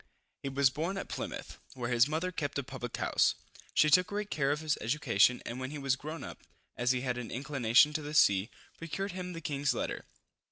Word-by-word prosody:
He 135 Hz, -, -3 dB
was 135 Hz, -1 st, +3 dB
born 170 Hz, +8 st, -2 dB
at -, -, -5 dB
Plymouth, -, -, -6 dB, 0.2 s
where 125 Hz, -2 st, -3 dB
his 120 Hz, +2 st, +5 dB
mother 160 Hz, +4 st, -1 dB
kept 145 Hz, -5 st, -3 dB
a 140 Hz, -, -1 dB
public 125 Hz, -2 st, -6 dB
house. -, -, +2 dB, 0.4 s
She 155 Hz, -, +5 dB
took 180 Hz, +3 st, +6 dB
great 205 Hz, 0 st, -4 dB
care 140 Hz, -2 st, +1 dB
of 150 Hz, -, 0 dB
his 155 Hz, -1 st, +1 dB
education, 125 Hz, -1 st, +2 dB
and 120 Hz, +2 st, -5 dB
when 130 Hz, 0 st, -4 dB
he 150 Hz, -, -6 dB
was 135 Hz, -2 st, +1 dB
grown 155 Hz, +4 st, -7 dB
up, -, -, -9 dB, 0.3 s
as 120 Hz, 0 st, 0 dB
he 130 Hz, -1 st, 0 dB
had 125 Hz, -2 st, -2 dB
an 120 Hz, -, -6 dB
inclination 135 Hz, +1 st, +3 dB
to 155 Hz, -, -1 dB
the 150 Hz, +1 st, -6 dB
sea, 100 Hz, -5 st, +5 dB, 0.3 s
procured 195 Hz, +5 st, -4 dB
him 180 Hz, 0 st, -5 dB
the 165 Hz, -, -7 dB
king's 145 Hz, -2 st, 0 dB
letter. -, -, -3 dB
140 Hz, 215 wpm, -31 LUFS, 125-155 Hz, 0.4 s, took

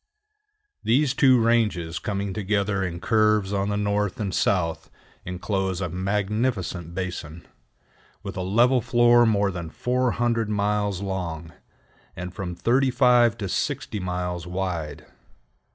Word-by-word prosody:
These 130 Hz, +4 st, +2 dB
two 130 Hz, -2 st, +5 dB
ranges 105 Hz, -8 st, +1 dB
coming 100 Hz, -1 st, -3 dB
together 100 Hz, 0 st, 0 dB
in 85 Hz, -2 st, -4 dB
curves 110 Hz, -1 st, +2 dB
on 100 Hz, 0 st, 0 dB
the 105 Hz, -, -1 dB
north 105 Hz, -1 st, -1 dB
and 100 Hz, -3 st, -2 dB
south 85 Hz, -5 st, 0 dB, 0.4 s
inclose 95 Hz, 0 st, -2 dB
a 90 Hz, -2 st, -2 dB
magnificent 95 Hz, -1 st, -2 dB
basin, 85 Hz, -3 st, -5 dB, 0.8 s
with 100 Hz, -2 st, -6 dB
a 95 Hz, -, -3 dB
level 120 Hz, +7 st, +3 dB
floor 120 Hz, 0 st, +4 dB
more 100 Hz, -2 st, +2 dB
than 85 Hz, -3 st, -6 dB
400 120 Hz, -1 st, 0 dB
miles 105 Hz, -2 st, 0 dB
long, 85 Hz, -4 st, -4 dB, 0.6 s
and 90 Hz, 0 st, -6 dB
from 90 Hz, -2 st, -5 dB
35 125 Hz, +2 st, +3 dB
to 100 Hz, -4 st, -4 dB
60 105 Hz, -, -2 dB
miles 90 Hz, -1 st, -3 dB
wide. 90 Hz, -4 st, -4 dB
100 Hz, 120 wpm, -24 LUFS, 90-115 Hz, 0.8 s, two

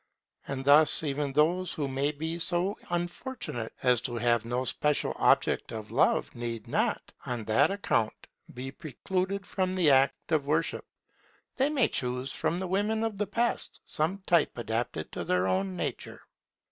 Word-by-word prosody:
And 135 Hz, -1 st, -4 dB
thus 150 Hz, +3 st, +5 dB
even 145 Hz, -1 st, -1 dB
those 170 Hz, +5 st, +2 dB
who 145 Hz, -3 st, -2 dB
may 135 Hz, +2 st, 0 dB
be 160 Hz, +3 st, -4 dB
so 180 Hz, +2 st, +3 dB
unfortunate 175 Hz, -, -3 dB
as 125 Hz, -2 st, +4 dB
to 125 Hz, -1 st, -3 dB
have 120 Hz, -1 st, +1 dB
no 125 Hz, +2 st, -1 dB
special 150 Hz, +3 st, +1 dB
object -, -, +2 dB
of 110 Hz, -1 st, -7 dB
love -, -, +2 dB
need 115 Hz, -2 st, -5 dB
not, -, -, -1 dB
on 120 Hz, -3 st, -3 dB
that 110 Hz, +8 st, +3 dB
account, 195 Hz, -, -1 dB, 0.3 s
be 130 Hz, +2 st, -6 dB
precluded 185 Hz, +7 st, -3 dB
from 185 Hz, -1 st, -1 dB
the 170 Hz, -6 st, +4 dB
act 135 Hz, +4 st, +2 dB
of 150 Hz, -3 st, +1 dB
worship: 155 Hz, +3 st, 0 dB, 0.7 s
they 270 Hz, +2 st, +3 dB
may 280 Hz, -6 st, +3 dB
choose 125 Hz, +1 st, -2 dB
from 170 Hz, -, -1 dB
the 190 Hz, -, -3 dB
women 210 Hz, +4 st, 0 dB
of 220 Hz, -3 st, -3 dB
the 210 Hz, -, 0 dB
past 235 Hz, +4 st, -1 dB
some 180 Hz, +5 st, -2 dB
type 170 Hz, -6 st, +2 dB
adapted 115 Hz, -8 st, -3 dB
to -, -, -4 dB
their 90 Hz, +1 st, +1 dB
own 95 Hz, 0 st, 0 dB
nature. 85 Hz, -, -4 dB
145 Hz, 160 wpm, -29 LUFS, 120-185 Hz, 0.7 s, thus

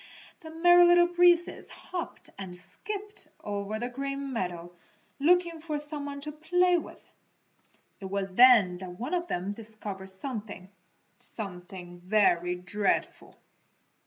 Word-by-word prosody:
The 320 Hz, -, -11 dB
Merry 350 Hz, +2 st, +6 dB
Little 350 Hz, 0 st, +6 dB
Breezes 350 Hz, 0 st, +3 dB
hopped 355 Hz, -2 st, -7 dB
and 185 Hz, -2 st, -8 dB
skipped 415 Hz, -, -8 dB, 0.2 s
over 205 Hz, +1 st, -3 dB
the 240 Hz, +2 st, -3 dB
Green 275 Hz, +2 st, -4 dB
Meadows 175 Hz, -5 st, -4 dB, 0.5 s
looking 340 Hz, +1 st, +2 dB
for 310 Hz, -2 st, -3 dB
some 295 Hz, 0 st, -3 dB
one 280 Hz, 0 st, -6 dB
to 300 Hz, +1 st, -5 dB
play 355 Hz, +4 st, +2 dB
with. -, -, -12 dB, 1.0 s
It 195 Hz, -, -8 dB
was 195 Hz, 0 st, -3 dB
then 210 Hz, -6 st, +6 dB
that 180 Hz, -1 st, -8 dB
one 250 Hz, -, -4 dB
of 350 Hz, -1 st, -1 dB
them 185 Hz, -, -3 dB
discovered 205 Hz, -3 st, -7 dB
something 205 Hz, -3 st, -5 dB, 0.5 s
something 180 Hz, -3 st, -9 dB
very 180 Hz, -2 st, +2 dB
dreadful. 185 Hz, +3 st, -2 dB
230 Hz, 130 wpm, -28 LUFS, -, 1.0 s, Merry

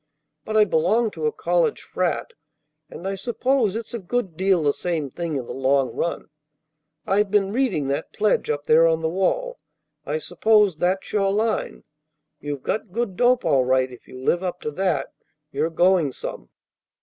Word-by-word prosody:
But 220 Hz, 0 st, -1 dB
I 215 Hz, -, +6 dB
belong 210 Hz, +6 st, +2 dB
to 460 Hz, -, -2 dB
a -, -, +1 dB
college 450 Hz, +2 st, 0 dB
frat, 470 Hz, -, -2 dB, 0.6 s
and 185 Hz, -, -7 dB
I 195 Hz, -, -1 dB
suppose 235 Hz, +2 st, 0 dB
it's 225 Hz, 0 st, -6 dB
a 235 Hz, -, -3 dB
good 195 Hz, -2 st, -3 dB
deal 190 Hz, -1 st, +2 dB
the 145 Hz, -1 st, +3 dB
same 160 Hz, -6 st, -3 dB
thing 170 Hz, 0 st, -4 dB
in 130 Hz, -3 st, -3 dB
the -, -, -7 dB
long 135 Hz, -2 st, +1 dB
run. 170 Hz, -2 st, -3 dB, 0.7 s
I've 200 Hz, +1 st, +2 dB
been 200 Hz, -1 st, +1 dB
reading 225 Hz, -, +1 dB
that 140 Hz, -, -2 dB
pledge 210 Hz, 0 st, +1 dB
up 145 Hz, -1 st, -2 dB
there 165 Hz, +2 st, +5 dB
on 160 Hz, 0 st, +1 dB
the 160 Hz, -, +1 dB
wall. -, -, -1 dB, 0.4 s
I 150 Hz, +1 st, -2 dB
suppose 200 Hz, +2 st, +2 dB
that's 185 Hz, +4 st, -1 dB
your 195 Hz, -2 st, +2 dB
line. 215 Hz, +2 st, -1 dB, 0.6 s
You've 145 Hz, -2 st, -5 dB
got 215 Hz, -3 st, -2 dB
good 225 Hz, -2 st, -2 dB
dope 245 Hz, 0 st, +3 dB
all 140 Hz, -5 st, +3 dB
right. 130 Hz, 0 st, +1 dB
If 125 Hz, -, -14 dB
you -, -, -11 dB
live 150 Hz, +7 st, +1 dB
up 180 Hz, -1 st, -3 dB
to 150 Hz, -, -3 dB
that, 170 Hz, -4 st, -1 dB, 0.4 s
you're 160 Hz, -, 0 dB
going 175 Hz, -4 st, +3 dB
some. -, -, -7 dB
185 Hz, 180 wpm, -23 LUFS, 155-215 Hz, 0.7 s, I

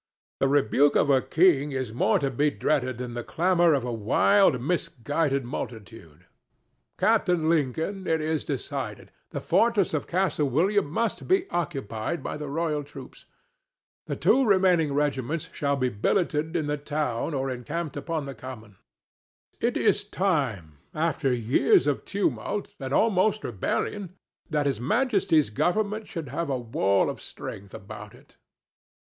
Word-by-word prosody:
"The 135 Hz, -, +3 dB
rebuke 140 Hz, +1 st, +3 dB
of 145 Hz, -, +3 dB
a 135 Hz, -1 st, +4 dB
king; 150 Hz, -4 st, +3 dB
is 130 Hz, -4 st, -3 dB
more 120 Hz, -, +2 dB
to 140 Hz, -2 st, -1 dB
be 145 Hz, +4 st, +2 dB
dreaded 130 Hz, -4 st, -1 dB
than 125 Hz, -1 st, -5 dB
the 120 Hz, 0 st, -4 dB
clamor 175 Hz, 0 st, +3 dB
of 135 Hz, -, -1 dB
a 120 Hz, -, -3 dB
wild, 125 Hz, -, +3 dB
misguided 145 Hz, -2 st, -1 dB
multitude.—Captain 115 Hz, -, -3 dB
Lincoln, 165 Hz, +5 st, 0 dB
it 160 Hz, 0 st, +2 dB
is 155 Hz, 0 st, -1 dB
decided: 135 Hz, -5 st, -5 dB, 0.2 s
the -, -, -4 dB
fortress 220 Hz, -8 st, +2 dB
of 155 Hz, -, -2 dB
Castle 175 Hz, -5 st, 0 dB
William 185 Hz, +8 st, +2 dB
must 225 Hz, +8 st, -2 dB
be 380 Hz, +1 st, +2 dB
occupied 135 Hz, -5 st, -3 dB
by -, -, -4 dB
the 150 Hz, -1 st, -6 dB
royal 150 Hz, 0 st, -1 dB
troops. 145 Hz, -, -12 dB, 0.8 s
The -, -, -2 dB
two 270 Hz, -, +3 dB
remaining 185 Hz, -, +3 dB
regiments 150 Hz, +2 st, -1 dB
shall 140 Hz, -1 st, 0 dB
be 130 Hz, -2 st, 0 dB
billeted 155 Hz, -, 0 dB
in 160 Hz, -3 st, 0 dB
the 150 Hz, 0 st, -1 dB
town 145 Hz, -1 st, -2 dB
or 135 Hz, 0 st, -1 dB
encamped 150 Hz, +5 st, -4 dB
upon 160 Hz, -4 st, -3 dB
the 140 Hz, -, -6 dB
Common. 115 Hz, -5 st, -10 dB, 0.8 s
It -, -, 0 dB
is -, -, +2 dB
time, 125 Hz, -, -1 dB, 0.2 s
after 155 Hz, -3 st, 0 dB
years 125 Hz, +2 st, +3 dB
of 145 Hz, -2 st, -1 dB
tumult, 205 Hz, +1 st, -2 dB
and 135 Hz, -2 st, -5 dB
almost 215 Hz, +4 st, +2 dB
rebellion, 180 Hz, -, -3 dB, 0.3 s
that 150 Hz, -2 st, 0 dB
His 135 Hz, -6 st, 0 dB
Majesty's 185 Hz, -, +2 dB
government 210 Hz, -, 0 dB
should 160 Hz, -5 st, -6 dB
have 150 Hz, +4 st, -3 dB
a 135 Hz, -, 0 dB
wall 100 Hz, -5 st, +1 dB
of -, -, -5 dB
strength 100 Hz, 0 st, -8 dB
about 100 Hz, -, -10 dB
it." -, -, -21 dB
145 Hz, 145 wpm, -26 LUFS, 130-170 Hz, 0.8 s, a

